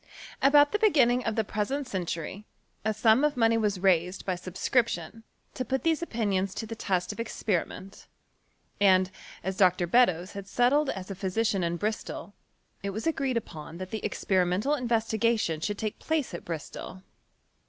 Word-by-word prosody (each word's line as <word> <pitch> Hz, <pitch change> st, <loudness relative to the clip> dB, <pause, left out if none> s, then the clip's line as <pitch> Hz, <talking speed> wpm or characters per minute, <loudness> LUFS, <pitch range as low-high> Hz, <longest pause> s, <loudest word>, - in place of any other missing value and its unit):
About 290 Hz, +1 st, +6 dB
the 420 Hz, -, 0 dB
beginning 255 Hz, -, +4 dB
of 225 Hz, -, -1 dB
the 220 Hz, -, +2 dB
present 235 Hz, +7 st, -2 dB
century, 185 Hz, -1 st, -4 dB, 0.4 s
a 220 Hz, -, +1 dB
sum 220 Hz, +4 st, +4 dB
of 300 Hz, -3 st, +1 dB
money 230 Hz, -1 st, +4 dB
was 210 Hz, -4 st, 0 dB
raised 180 Hz, -1 st, +2 dB
by 185 Hz, -, 0 dB
sub 180 Hz, 0 st, -8 dB
scription, 225 Hz, -5 st, 0 dB, 0.3 s
to 255 Hz, -, -3 dB
put 265 Hz, +1 st, -2 dB
these 325 Hz, -1 st, +2 dB
opinions 200 Hz, -, -1 dB
to 225 Hz, -, -4 dB
the 225 Hz, -, -6 dB
test 185 Hz, -5 st, -1 dB
of -, -, -10 dB
expe 215 Hz, -5 st, 0 dB
riment; 195 Hz, +2 st, -12 dB, 0.7 s
and, 185 Hz, -2 st, +4 dB, 0.3 s
as 190 Hz, 0 st, -3 dB
Dr. 180 Hz, -2 st, +4 dB
Beddoes 185 Hz, -3 st, +3 dB
had 200 Hz, -1 st, -8 dB
settled 265 Hz, +7 st, +3 dB
as 190 Hz, 0 st, -5 dB
a -, -, -4 dB
phy 190 Hz, +1 st, -3 dB
sician 200 Hz, -1 st, +1 dB
in 170 Hz, 0 st, -1 dB
Bristol, 210 Hz, -2 st, -4 dB, 0.5 s
it 200 Hz, -, -3 dB
was 215 Hz, +3 st, -5 dB
agreed 275 Hz, -6 st, 0 dB
upon 160 Hz, -6 st, -7 dB
that 185 Hz, 0 st, -7 dB
the 220 Hz, -, -3 dB
expe 190 Hz, -2 st, 0 dB
rimental 190 Hz, +11 st, 0 dB
investigation 225 Hz, -, +1 dB
should 205 Hz, +6 st, -2 dB
take 215 Hz, 0 st, -4 dB
place 315 Hz, -, -1 dB
at 170 Hz, -, -6 dB
Bristol. 170 Hz, +3 st, -7 dB
210 Hz, 175 wpm, -28 LUFS, 185-240 Hz, 0.7 s, About